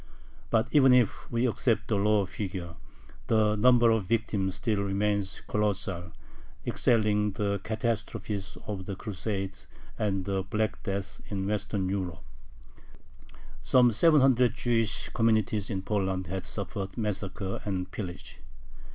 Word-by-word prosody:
But 115 0 +2
even 135 -4 +6
if 125 -4 +2
we 120 +1 +1
accept 115 0 +1
the 110 - +1
lower 105 0 +3
figure, 95 -5 -5 0.5
the 110 -1 +3
number 120 +1 +5
of 110 -4 +1
victims 100 -4 0
still 105 0 0
remains 100 0 -1
colossal, 95 -5 -1 0.5
excelling 105 -3 +2
the 100 0 -1
catastrophes 110 -3 -3
of 95 -3 -5
the 100 - -3
Crusades 95 -1 -4 0.3
and 95 -3 0
the 95 -1 0
Black 105 +3 -2
Death 100 0 -4
in 95 -2 -3
Western 100 -1 -1
Europe. 95 -4 -3 1.4
Some 125 - +5
seven 150 +6 +5
hundred 125 -2 +4
Jewish 115 -3 0
communities 110 -3 +1
in 95 -4 -3
Poland 95 -3 -1
had 95 +2 -5
suffered 100 0 -5
massacre 100 -2 -3
and 95 -2 -3
pillage. 95 -8 -7
105 Hz, 125 wpm, -28 LUFS, 95-110 Hz, 1.4 s, even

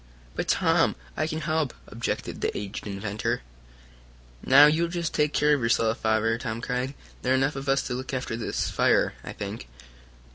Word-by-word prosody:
"But, - - -3
Tom, - - +3 0.2
I 155 - 0
can 160 0 -3
help," 155 -3 -1
objected 115 +1 -4
the - - -1
aged 100 +1 -5
inventor. 100 - -2 1.0
"Now, 140 +3 +8
you 160 +3 +3
just 170 -1 -3
take 150 0 +2
care 150 0 +3
of 145 - +1
yourself, 115 -1 +2
Father!" 110 +1 +1
Tom 115 -1 -4
cried. 125 +3 -2 0.3
"There 130 - +2
are - - +4
enough 135 +2 +1
of 135 0 -4
us 135 0 +3
to 125 - -3
look 130 +1 -4
after 130 -3 -3
this 115 - -2
fire, - - +3
I - - -6
think." - - -6
130 Hz, 180 wpm, -26 LUFS, 115-150 Hz, 1.0 s, Now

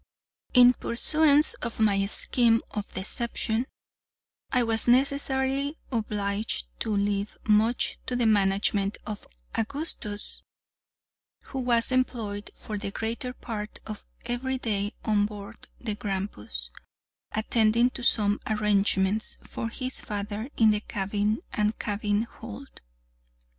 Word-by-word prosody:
In 250 0 +9
pursuance 300 +5 +4
of 235 -2 -3
my 200 -2 +3
scheme 230 +2 +3
of 210 -1 -5
deception, 225 +4 -1 0.8
I 250 -2 +3
was 225 0 +1
necessarily 270 +2 +2
obliged 210 - -1
to - - -1
leave 200 0 -1
much 220 +2 +2
to 250 - -1
the 245 -1 +2
management 200 -1 +2
of 210 -1 -6 0.3
Augustus, 225 -4 -3 1.1
who 270 - -4
was 240 -1 +2
employed 225 -5 -1
for 210 -1 -6
the 200 - -3
greater 230 +4 -3
part 215 -4 -6
of 215 -1 -7 0.2
every 255 +2 -1
day 205 -4 -1
on 205 -2 +3
board 205 -1 -10
the 220 -3 -2
Grampus, 190 - -3 0.6
attending 225 +2 +3
to 250 - -6
some 205 -3 +3
arrangements 210 -1 +1
for 230 - -4
his 255 +2 -3
father 210 +3 -4
in 220 -1 +6
the 210 - +1
cabin 205 +1 -1
and 210 +1 +1
cabin 205 0 0
hold. 235 +3 -10
220 Hz, 115 wpm, -27 LUFS, 205-245 Hz, 1.1 s, In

